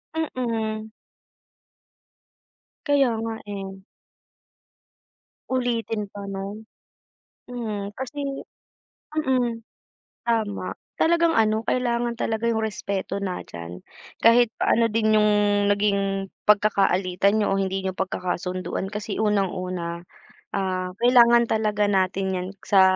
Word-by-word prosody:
Mm. 225 -7 -2 2.0
Kaya 280 -3 +4
nga, 225 0 -3
eh. 195 -1 -6 1.7
Ulitin 235 -4 -1
pa 200 -1 -7
no'n. 195 +2 -5 0.9
Hmm, 215 -5 -5
kasi 275 +2 -4 0.7
mm, 255 -6 0 0.6
tama. 220 -3 -1 0.2
Talagang 335 0 +3
ano 220 0 +2
kailangan 240 -1 0
talaga 225 -1 -1
'yong 225 -1 +1
respeto 200 -2 -3
nandiyan, 90 - -6 0.4
kahit 230 0 +5
pa - - 0
ano 230 0 +4
din 215 -1 +2
'yong 210 0 +4 0.4
naging 200 -1 +1 0.2
pagkakaalitan 200 -1 +3
niyo - - +1
o 195 - +1
hindi 195 0 -1
niyo 190 - -1
pagkakasunduan. 185 -1 -2
Kasi 210 +1 -4
unang-una, 185 -5 -1 0.6
ah, 185 -1 -1
kailangan 240 0 +6
talaga 215 -2 +1
natin 190 -1 +1
yan 180 0 -2 0.2
sa 195 -2 +5
210 Hz, 100 wpm, -24 LUFS, 195-235 Hz, 2.0 s, kailangan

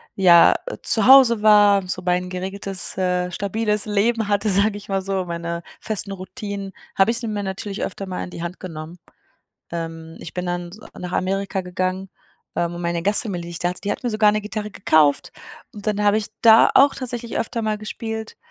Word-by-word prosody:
ja, 175 -3 +6
äh, - - -6
zu 220 -1 +2
Hause 255 -4 +7
war, 205 -2 +5
so 185 - -3
mein 180 0 0
geregeltes, 190 +1 -2
äh, 180 -1 0
stabiles 210 +2 -1
Leben 215 +1 0
hatte, 205 +1 +1
sage 200 +2 +2
ich 205 0 -12
mal 195 -1 -1
so, 190 -1 -2
meine 170 0 -4 0.2
festen 210 -2 -2
Routinen, 200 0 -6 0.3
habe 195 +4 +4
ich 235 - 0
sie 230 - -4
mir 210 -2 -3
natürlich 195 +1 -4
öfter 195 +1 -5
mal 185 -1 -4
in - - -7
die 170 - -8
Hand 175 +2 -6
genommen. 165 -1 -8 0.7
Ähm, 165 -1 -6
ich 165 - -8
bin 180 0 -4
dann 175 0 -3
s 200 - -13 0.2
nach 180 0 -6
Amerika 195 +1 -1
gegangen, 185 +1 -3 0.5
ähm, 170 0 0
wo 175 - -7
meine 170 -1 -2
Gastfamilie, 200 -2 0
die 170 - -8
ich 170 - -6
da 175 - 0
hatte, 180 - -8
die 205 - -2
hat - - -7
mir 245 - -1
sogar 215 -1 +3
'ne 215 - 0
Gitarre 210 0 -5
gekauft 155 -7 +2 0.4
und 205 0 -9
dann 210 -1 0
habe 205 0 +4
ich 215 -1 -2
da 225 -1 +7
auch 280 +1 +6
tatsächlich 240 -2 -3
öfter 230 - -2
mal 215 -1 -1
gespielt, 220 +1 -6
195 Hz, 205 wpm, -21 LUFS, 180-215 Hz, 0.7 s, Hause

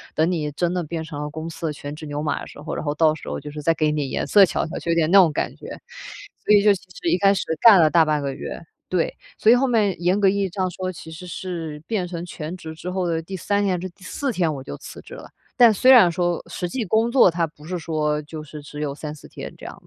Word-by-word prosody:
“等 160 +3 +2
你 150 -4 -2
真 175 +3 0
的 180 - -1
变 160 +1 -4
成 145 -2 -7
了 150 - -4
公 160 +1 -6
司 165 0 -5
的 150 - -2
全 145 +1 -7
职 155 - -9
牛 145 +1 -4
马 150 - -1
的 - - -8
时 - - -13
候， 155 +1 -5
然 - - -4
后 145 -1 -2
到 155 -1 +4
时 - - -9
候 - - -3
就 150 +1 -8
是 150 - -7
再 165 - +2
给 155 -1 +1
你 145 -3 -2
颜 - - -2
色 200 -2 +7
瞧 - - -1
瞧”， - - -5
就 170 - -5
有 165 - +2
点 160 0 +2
那 195 - +8
种 170 -5 +5
感 - - -3
觉。 - - -11 0.8
所 - - +2
以 200 - +5
就 205 -1 +6
其 190 - -6 0.2
实 170 - 0
一 175 - +3
开 195 +1 +5
始 - - -1 0.2
干 220 -5 +9
了 160 - +6
大 165 0 +5
半 155 -1 +1
个 140 -1 -3
月， - - -6 0.3
对， 180 -3 0 0.2
所 220 - +5
以 - - +8
后 265 +2 +2
面 210 -6 +2
严 180 +3 +2
格 200 - +4
意 200 - 0
义 195 - 0
上 185 +1 -1
说， 185 +1 -4
其 160 -2 -11
实 165 +3 -9
是 165 -4 -5
变 200 -6 -1
成 175 -1 -6
全 165 0 -6
职 160 -3 -8
之 170 +3 -6
后 185 -1 -1
的 165 -1 -1
第 190 +3 -7
3 205 +3 0
天， 190 -2 +1
还 175 - -7
是 185 - -4
第 185 +2 -20
4 270 - -3
天 175 -6 0
我 135 - -7
就 70 - -7
辞 - - -10
职 - - -13
了， - - -11 0.3
但 240 -2 +8
虽 255 +6 +5
然 230 -9 +8
说 175 0 -1
实 180 - -3
际 250 +5 -2
工 220 +4 +2
作 250 -7 +6
它 170 0 0
不 150 -1 -19
是 180 +2 -3
说， 155 -2 -1
就 155 +1 -8
是 150 0 -10
只 145 +1 -9
有 140 -2 -3
3-4 150 -1 -8
天 - - -8
这 - - -12
样 - - -8
170 Hz, 310 characters per minute, -22 LUFS, 155-190 Hz, 0.8 s, 干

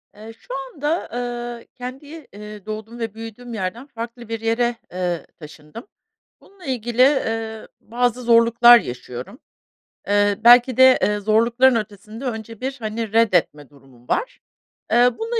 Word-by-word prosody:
Eee, 215 +2 -11
şu 255 - -10 0.2
anda, 300 +4 -2 0.5
eee, - - -19
kendi, 270 +5 -9
eee, 210 0 -10
doğduğum 220 +2 -7
ve 225 -2 -4
büyüdüğüm 225 +2 -9
yerden 220 +6 -5
farklı 235 -1 -8
bir 225 0 -3
yere, 235 +1 0 0.2
eee, 180 -2 -3
taşındım. 150 - -12 0.5
Bununla 390 -3 -18
ilgili, 240 -2 -1
eee, 225 -5 +1
bazı 245 +1 -1
zorluklar 235 0 +6
yaşıyorum. 125 - -8 0.7
Eee, 205 0 +2
belki 245 +1 +6
de, 260 0 +7
eee, 210 0 +1
zorlukların 235 +5 +3
ötesinde 215 +3 -6
önce 225 -2 -6
bir, 265 +1 -3
hani, 220 -1 -4
reddetme 180 - +1
durumum 130 -4 -21
var. - - -2 0.5
Eee, 245 +1 +5
bununla 460 +1 -2
230 Hz, 135 wpm, -21 LUFS, 210-245 Hz, 0.7 s, de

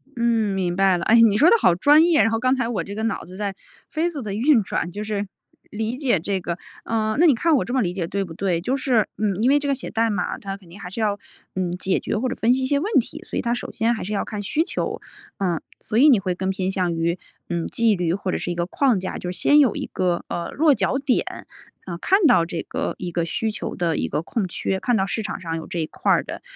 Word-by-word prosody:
嗯， 230 -4 +1
明 180 -2 -1
白 190 -1 +3
了， - - -4
哎， 225 - +5
你 215 -3 +5
说 310 +10 +6
得 - - +6
好 175 - +4
专 295 - +6
业， 335 -2 +4
然 225 - +2
后 225 - 0
刚 255 +2 +2
才 245 -3 -1
我 230 -4 -2
这 200 - -7
个 220 - -3
脑 225 -2 -1
子 180 +2 -11
在 200 -1 -3 0.3
飞 325 +2 0
速 305 -5 -5
的 210 -4 -4
运 235 +2 +3
转， 175 - -2
就 205 +4 -5
是 205 -1 -3 0.4
理 220 +3 -3
解 255 - +1
这 195 +4 -2
个 175 -1 -3 0.3
呃， 215 -1 0
那 345 - +6
你 290 - +5
看 325 +6 +2
我 - - +1
这 - - -6
么 260 - +2
理 175 -2 -2
解 180 -3 -3
对 200 +3 -2
不 170 - -9
对？ 175 -1 0
就 245 +10 -1
是 255 -5 +1
嗯， 205 -2 0
因 250 - +4
为 290 - +5
这 285 - -4
个 275 - +2
写 - - -7
代 225 +1 +1
码 185 -4 -2
它 195 -1 -6
肯 185 -4 -19
定 185 - -12
还 180 - -7
是 190 - -7
要， 205 -1 0 0.4
嗯， 185 -2 -1
解 185 +1 0
决 - - -2
或 255 +4 -1
者 255 - -3
分 230 +2 +2
析 260 +1 0
一 - - +1
些 280 +2 +1
问 395 +9 -2
题， - - -5
所 - - -5
以 - - +1
它 235 -1 0
首 240 - -5
先 230 +2 +1
还 220 - -4
是 200 - -5
要 200 - 0
看 210 -1 -5
需 300 +10 0
求。 - - -3 0.4
呃， 180 -5 0 0.2
所 - - -5
以 300 - +7
你 245 -7 +6
会 185 -2 -2
更 190 +1 -3
偏 190 0 -1
向 180 -3 -1
于， 170 +2 -1 0.3
嗯， 170 -1 -2
纪 230 -2 +2
律 175 -2 0
或 190 -2 -3
者 - - -1
是 - - -4
一 - - -3
个 170 0 -1
框 240 +3 +1
架， 185 - -4
就 180 - -4
是 - - -5
先 295 - +5
有 270 -7 +4
一 - - -3
个， 180 -2 -1
呃， 170 0 -3
落 305 0 +4
脚 265 - 0
点， 270 -2 -1 0.4
呃， 170 -2 -5
看 385 - +3
到 245 - +5
这 165 0 -4
个 - - -3
一 180 -1 -5
个 170 0 -1
需 220 +6 -1
求 215 - -5
的 170 -3 0
一 - - -1
个 150 - -2
空 195 +3 -2
缺， 190 +2 -2
看 245 +4 +1
到 190 - +1
市 220 - -2
场 210 -2 -5
上 165 -3 -4
有 160 - -7
这 175 - -4
一 160 - 0
块 - - -1
儿 - - +3
的， - - -7
205 Hz, 305 characters per minute, -23 LUFS, 180-245 Hz, 0.4 s, 以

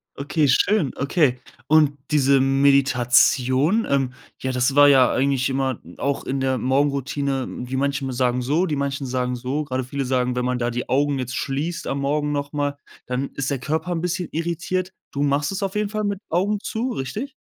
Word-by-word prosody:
Okay, 145 +1 0
schön. 175 +1 +3
Okay, 140 -3 +1 0.3
und 150 -2 +4
diese 140 -2 +4
Meditation, 135 - +3
ähm 135 -2 +1 0.3
ja, 130 - -1
das 130 +2 +1
war 145 0 +8
ja 130 -2 +6
eigentlich 135 -1 +1
immer 130 -2 -1
n 85 - -14
auch 140 0 -1
in 135 0 -2
der 130 -1 +1
Morgenroutine, 135 +1 0
wie 125 +1 -4
manche 140 0 -1
mal 130 - -2
sagen 125 0 0
so, 150 +9 +1
die 155 - -1
manchen 140 -1 -2
sagen 125 0 -1
so, 130 +5 -2
gerade 130 -3 -3
viele 140 +2 -3
sagen, 125 -1 0
wenn 125 - -1
man 125 0 -1
da 120 - 0
die 120 +1 -4
Augen 140 +1 +2
jetzt 125 -1 -4
schließt 160 +6 -3
am 140 - -2
Morgen 150 +1 0
noch 145 0 -3
mal, 145 -1 -2 0.3
dann 125 +2 -2
ist 135 -1 -2
der 140 -3 -2
Körper 160 +6 -2
'n 165 - -2
bisschen 180 0 -2
irritiert. 170 +3 -2 0.2
Du 140 - -1
machst 145 +4 +1
es 195 - -3
auf 195 0 -3
jeden 210 -1 0
Fall 215 0 -2
mit 200 -2 -2
Augen 195 +5 +1
zu, 240 +4 -3
richtig? 215 - -4
140 Hz, 200 wpm, -22 LUFS, 130-150 Hz, 0.3 s, war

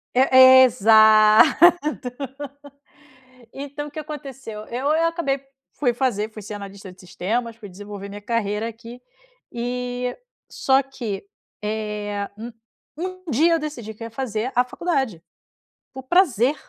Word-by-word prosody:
É 260 0 +8
é - - +9
exato, 220 - +6 1.9
então 285 +2 -6
o - - -12
que - - -13
aconteceu? 270 -8 -8
Eu 255 +4 -3
eu 325 +2 +2
acabei 280 -5 -2 0.3
fui 245 -4 0
fazer, 230 -4 -1
fui 215 -1 -10
ser 210 +2 -8
analista 200 -1 -9
de 185 - -19
sistemas, 225 +6 -3
fui 215 -3 -11
desenvolver 200 +1 -9
minha 205 +1 -9
carreira 215 -1 -2
aqui 230 +2 -11 0.5
e, 245 +1 -3 0.3
só 270 +1 +2
que, 235 -8 -6 0.4
eh, 210 -1 -3
um 235 +2 -7 0.5
um 370 +2 -6
dia 320 +8 +3
eu 330 - +2
decidi 245 -8 -6
que 220 - -11
eu - - -5
ia - - -13
fazer 230 0 -3
a 245 0 +3
faculdade, 265 - -2 0.7
por 265 - -8
prazer. 275 - +2
240 Hz, 140 wpm, -22 LUFS, 215-270 Hz, 1.9 s, é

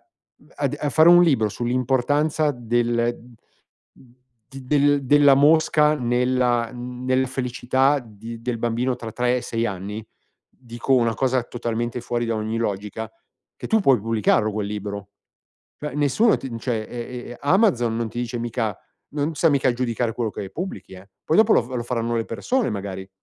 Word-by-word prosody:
mhmm, - - -38 0.5
ad - - -2
a 150 - -1
fare 160 +3 +5
un 175 0 +8
libro 135 -11 +3
sull'importanza 135 +6 0
del 120 -1 0 0.7
d 125 -1 -21
del 145 +2 +2
della 145 +1 +6
mosca 150 +1 +4
nella 125 -1 +1
nella 125 +1 -2
felicità 130 +2 +1
di 115 -1 -10
del 120 0 -3
bambino 120 +2 -1
tra 115 -2 -7
3 125 +2 0
e - - -5
6 115 0 -2
anni, 100 +1 -5 0.5
dico 120 +1 -5
una 115 -3 +3
cosa 130 +1 +1
totalmente 120 0 -3
fuori 120 0 -2
da 115 -1 -1
ogni 110 +1 -3
logica, 105 0 -3 0.5
che - - -7
tu 220 - +2
puoi 135 - +4
pubblicarlo 110 0 +1
quel 105 -1 -3
libro. 100 -1 -5 0.7
Cioè 150 -2 -6
nessuno 150 - +3
ti 135 - -7
n 115 - -5
cioè, 115 -2 -2
e 120 - -7
e 120 +1 -6
e 120 - -8
Amazon 145 - +2
non 115 0 -2
ti 120 - -8
dice 120 0 -3
mica 115 -4 -2 0.3
non 150 +2 -2
sta 165 +4 +3
mica 135 -4 +2
giudicare 120 -1 -1
quello 115 -3 -2
che 95 - -6
pubblichi, 100 - -6
eh. 95 +1 -14 0.2
Poi 160 - +1
dopo 220 0 +5
lo - - +4
f 120 - -12
lo 125 -2 -4
faranno 120 -1 -2
le 115 - -1
persone 245 - -1
magari 95 -2 -5
120 Hz, 175 wpm, -23 LUFS, 115-135 Hz, 0.7 s, un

